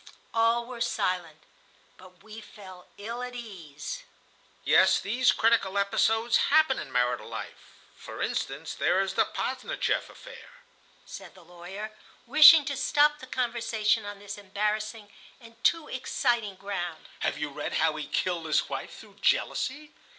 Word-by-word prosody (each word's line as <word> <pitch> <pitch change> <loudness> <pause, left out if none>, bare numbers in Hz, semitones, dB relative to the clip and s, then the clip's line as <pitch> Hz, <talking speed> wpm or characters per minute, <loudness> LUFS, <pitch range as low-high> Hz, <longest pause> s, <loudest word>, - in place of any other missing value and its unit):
All 230 +1 +2
were 245 -1 -9
silent, 180 -8 -2 0.5
but 185 +1 -17
we 220 +1 -10
felt 190 -4 -13
ill 230 +4 -6
at 250 0 -6
ease. 195 - -8 0.6
"Yes, - - +5
these 240 +5 +2
critical 220 -4 +2
episodes 225 +3 +2
happen 310 -3 +4
in - - -8
marital 125 0 0
life. - - -9 0.2
For - - -10
instance, - - -3
there 185 - +1
is 195 0 -2
the - - +3
Posdnicheff 255 -1 -2
affair," - - -13 0.6
said - - -11
the 180 -3 -17
lawyer, 180 +5 -8 0.3
wishing 305 +3 +9
to 280 - -2
stop 295 +3 +3
the 260 - -11
conversation 230 -3 0
on 205 0 -7
this 205 0 -8
embarrassing 210 +1 -3 0.3
and 230 -2 -17
too 330 -2 +2
exciting 240 -5 -1
ground. 175 -4 -5
"Have - - -1
you 150 -1 -4
read 145 +1 -5
how 160 -1 +2
he 155 - -5
killed 175 -3 -1
his 155 - +1
wife - - -6
through - - -15
jealousy?" 295 +3 0
215 Hz, 145 wpm, -28 LUFS, 185-245 Hz, 0.6 s, wishing